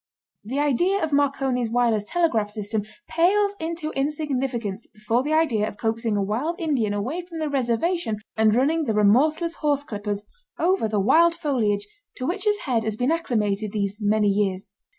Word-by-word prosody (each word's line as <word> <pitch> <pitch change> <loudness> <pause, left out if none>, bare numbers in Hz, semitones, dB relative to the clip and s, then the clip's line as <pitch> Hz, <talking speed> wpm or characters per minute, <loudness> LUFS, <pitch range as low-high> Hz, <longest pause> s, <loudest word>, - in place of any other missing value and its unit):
The 245 +7 -4
idea 325 +7 +2
of 310 -2 -1
Marconi's 270 -4 +1
wireless 230 -3 +2
telegraph 230 -7 +1
system 210 +1 -3 0.3
pales 400 +5 +2
into 325 -1 -4
insignificance 265 -7 -2
before 220 +3 -1
the 295 +4 -1
idea 255 -10 +2
of 205 - -8
coaxing 225 -1 -1
a 200 - +1
wild 250 - -2
Indian 275 - 0
away 240 - -2
from 345 -1 -10
the 310 -1 -1
reservation 270 - 0 0.2
and 220 -1 +3
running 305 +6 +2
the 220 -4 0
remorseless 305 - +3
horse 290 -2 +1
clippers 205 -4 -4 0.3
over 355 - +2
the 215 -1 0
wild 335 - +4
foliage 235 -11 0 0.3
to 255 - -4
which 375 +7 -2
his 415 0 +1
head 240 -5 0
has 220 -1 -2
been 250 +5 +1
acclimated 215 -10 -1
these 205 0 -2
many 210 0 +2
years. 195 -1 -1
250 Hz, 170 wpm, -24 LUFS, 210-315 Hz, 0.3 s, wild